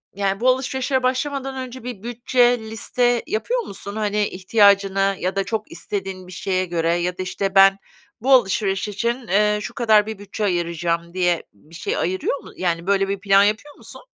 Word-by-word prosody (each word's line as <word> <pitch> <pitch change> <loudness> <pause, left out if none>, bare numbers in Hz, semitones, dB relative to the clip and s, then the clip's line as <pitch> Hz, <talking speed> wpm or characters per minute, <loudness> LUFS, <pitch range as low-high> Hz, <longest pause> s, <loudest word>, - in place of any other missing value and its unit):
yani, 195 -1 -1
bu 255 +2 +3
alışverişe 260 0 0
başlamadan 270 +1 -1
önce 255 0 -11
bir 240 -5 -7
bütçe, 245 0 +2
liste 235 +2 0
yapıyor 475 - -1
musun? 200 - -8
Hani, 210 -1 0
ihtiyacını 195 0 +3
ya 185 +2 -2
da 195 - +1
çok 220 0 -4
istediğin 190 -2 -5
bir - - -11
şeye 185 +1 -1
göre 170 -1 0
ya 180 +1 -2
da, 185 - -3
işte, 195 +1 -3
ben 195 0 +7 0.4
bu 265 +2 +3
alışveriş 195 -4 +2
için, 235 +4 -2
eee, 210 +2 +2
şu - - -6
kadar 215 -3 +4
bir 220 -2 -6
bütçe 205 +1 -6
ayıracağım 170 -2 -1
diye 175 -2 +1
bir 150 +11 -18
şey 165 - -3
ayırıyor 185 +10 -1
mu, - - -13
yani 170 0 -2
böyle 195 -1 +2
bir 200 -1 -2
plan 200 0 +5
yapıyor 220 +8 -1
musun? - - -13
200 Hz, 180 wpm, -21 LUFS, 185-235 Hz, 0.4 s, ben